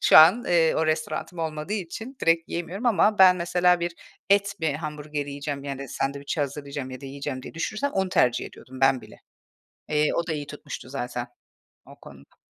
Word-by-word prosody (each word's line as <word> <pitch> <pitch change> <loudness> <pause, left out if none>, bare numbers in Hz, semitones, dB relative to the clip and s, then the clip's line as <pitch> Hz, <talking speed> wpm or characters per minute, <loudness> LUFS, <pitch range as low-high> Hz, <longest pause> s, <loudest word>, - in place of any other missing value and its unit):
şu - - +7
an, 185 +10 +8
eee, 165 -2 +4
o 160 - +1
restoranım 155 +2 -2
olmadığı 160 +3 -3
için 220 +7 -5
direkt 165 0 +2
yiyemiyorum 180 +8 -4
ama 210 -1 +3
ben 185 -1 +8
mesela 180 0 +3
bir 170 0 -1 0.4
et 200 0 +4
mi 150 -3 0
hamburgeri 150 -2 -5
yiyeceğim, 140 0 -4
yani, 140 -1 -5
sandviçi 140 +4 -2
hazırlayacağım 140 -1 -4
ya 130 - -8
da 140 - -8
yiyeceğim 140 -1 -5
diye - - -10
düşünürsem 215 +11 -2
onu 190 -1 0
tercih 125 -8 +2
ediyordum 130 +1 -12
ben 135 -1 +4
bile. - - -14 0.7
Eee, 150 0 +2
o 170 +1 -1
da 160 - -1
iyi 145 -2 -4
tutmuştu 145 -3 -8
zaten 125 -2 -4 0.6
o - - -15
konuda. 70 0 -15
155 Hz, 180 wpm, -25 LUFS, 140-175 Hz, 0.7 s, an